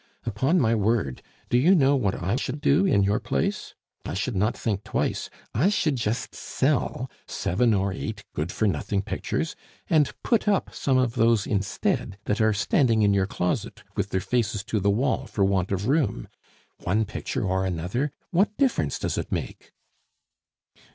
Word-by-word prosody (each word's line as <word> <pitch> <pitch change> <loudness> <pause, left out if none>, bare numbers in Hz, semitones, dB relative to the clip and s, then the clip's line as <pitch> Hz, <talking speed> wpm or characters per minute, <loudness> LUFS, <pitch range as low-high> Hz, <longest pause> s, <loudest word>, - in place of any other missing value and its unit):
Upon 130 - +1
my 115 -5 +3
word, 105 - 0 0.3
do 120 - +4
you 175 +9 +5
know 140 -3 +4
what 105 -8 +1
I 95 +5 -1
should 135 +2 -3
do 155 +7 +3
in 100 - +4
your 100 +2 +2
place? - - -2 0.3
I - - -4
should 110 +4 -2
not 105 +5 +1
think 105 -3 -2
twice, - - -2 0.2
I 150 - +3
should 165 -8 +1
just 115 -1 -2
sell 130 -2 -1 0.2
seven 115 +7 +1
or 95 0 0
eight 105 +1 -5
good 75 +4 -2
for 110 - +1
nothing 100 0 -1
pictures - - -3 0.4
and 150 -3 +4
put 230 -3 +1
up 200 -2 +1
some 135 -2 +1
of 125 -2 +2
those 115 -3 +3
instead 95 -1 -1
that 105 - 0
are 110 0 +4
standing 110 +2 +2
in 100 -1 +4
your 95 -1 +2
closet 90 -3 -2
with - - -1
their 95 - 0
faces 105 -3 0
to 110 0 -1
the 100 +1 +1
wall 130 +5 +1
for 100 - +1
want 95 -1 +1
of 100 +2 -1
room. 130 - +1 0.5
One 105 +5 +1
picture 105 - -4
or 95 0 +1
another, 95 - -1 0.2
what 200 +4 +2
difference 270 -3 +1
does - - -2
it - - -5
make?" - - -4
110 Hz, 175 wpm, -25 LUFS, 100-135 Hz, 0.5 s, you